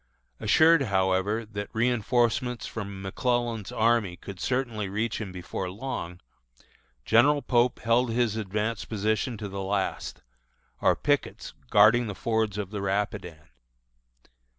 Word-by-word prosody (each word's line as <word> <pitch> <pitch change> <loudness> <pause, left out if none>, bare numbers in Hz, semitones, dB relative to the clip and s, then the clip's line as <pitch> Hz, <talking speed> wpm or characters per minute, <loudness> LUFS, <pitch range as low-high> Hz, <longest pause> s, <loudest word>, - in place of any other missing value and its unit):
Assured, 165 0 +5
however, 95 0 +1
that 105 -1 -6
reënforcements 120 +1 +1
from 100 -3 -6
McClellan's 120 +1 -1
army 110 -5 +1
could 95 +1 -9
certainly 120 -5 -1
reach 110 +3 -2
him 100 -3 -5
before 90 0 -5
long, 90 -5 -5 0.9
General 140 +6 +4
Pope 120 0 +2
held 115 +2 +2
his 115 -2 +1
advanced 105 +1 -3
position 110 +3 -1
to 105 - -5
the 100 0 -5
last, 95 0 -3 0.6
our - - +4
pickets - - -1 0.2
guarding 110 +3 +5
the 105 - -5
fords 110 -2 -1
of 100 -2 -4
the 105 -2 -4
Rapidan. 95 -5 -3
110 Hz, 125 wpm, -27 LUFS, 100-120 Hz, 0.9 s, Assured